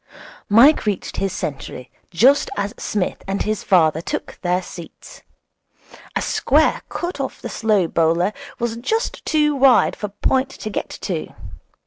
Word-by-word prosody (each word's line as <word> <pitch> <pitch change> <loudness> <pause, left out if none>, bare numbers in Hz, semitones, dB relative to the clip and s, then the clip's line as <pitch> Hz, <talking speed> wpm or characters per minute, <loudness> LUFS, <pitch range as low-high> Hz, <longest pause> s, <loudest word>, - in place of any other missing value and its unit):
Mike 235 +5 +6
reached 200 -3 -2
his 195 -1 -1
century 135 -6 -6 0.2
just 255 +11 +4
as 200 +2 -2
Psmith 205 -4 -2
and 195 +1 -1
his 215 -1 -2
father 160 -4 +3
took - - -5
their 180 0 0
seats. 175 - -11 0.9
A - - 0
square - - +2
cut 350 -3 -4
off 270 - -4
the - - -6
slow 215 -5 +1
bowler 165 +5 +1 0.2
was 235 -1 -2
just 445 - -2
too 300 -1 +2
wide 265 -2 +4
for 210 - -4
point 260 +6 0
to 215 - -7
get - - -3
to. 170 -6 -3
205 Hz, 145 wpm, -20 LUFS, 180-260 Hz, 0.9 s, Mike